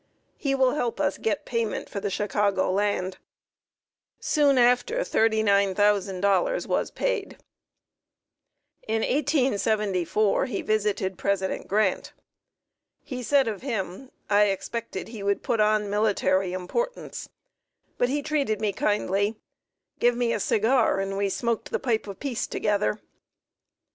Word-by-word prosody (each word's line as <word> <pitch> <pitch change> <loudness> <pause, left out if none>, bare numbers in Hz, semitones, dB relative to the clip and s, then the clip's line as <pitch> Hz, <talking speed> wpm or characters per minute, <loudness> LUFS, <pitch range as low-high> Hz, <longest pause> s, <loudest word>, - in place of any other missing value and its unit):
He 275 -2 -1
will 260 -1 +3
help 245 -6 -2
us 190 - 0
get 215 -3 -1
payment 230 -3 -2
for 200 0 -3
Chicago 200 -1 0
land." 190 -2 -1 1.0
Soon 285 -3 +3
after 250 - +3
$39,000 205 - +2
was - - 0
paid. - - -2 1.5
In 220 0 0
1874 215 - +1
he 225 -6 -3
visited 205 -3 -1
President 195 -1 -1
Grant. 205 -1 0 0.9
He 255 -2 -6
said 270 +1 +3
of 210 -3 -3
him: 230 -1 -4 0.2
"I 205 0 +4
expected 200 +1 -4
he 225 -3 -8
would 200 0 0
put 230 - 0
on 210 0 +3
military 200 -3 +1
importance, 475 - -4 0.7
but 245 - +2
he 290 +2 -1
treated 280 -9 0
me 210 -2 0
kindly, 205 +1 0 0.6
give 240 0 +3
me 240 -1 +1
a - - -1
cigar, 220 +1 +2
and 195 0 -2
we 200 0 0
smoked 235 +2 -2
the - - 0
pipe 225 -5 -1
of 200 - -8
peace 265 -5 -3
together." 210 0 0
215 Hz, 125 wpm, -26 LUFS, 200-245 Hz, 1.5 s, I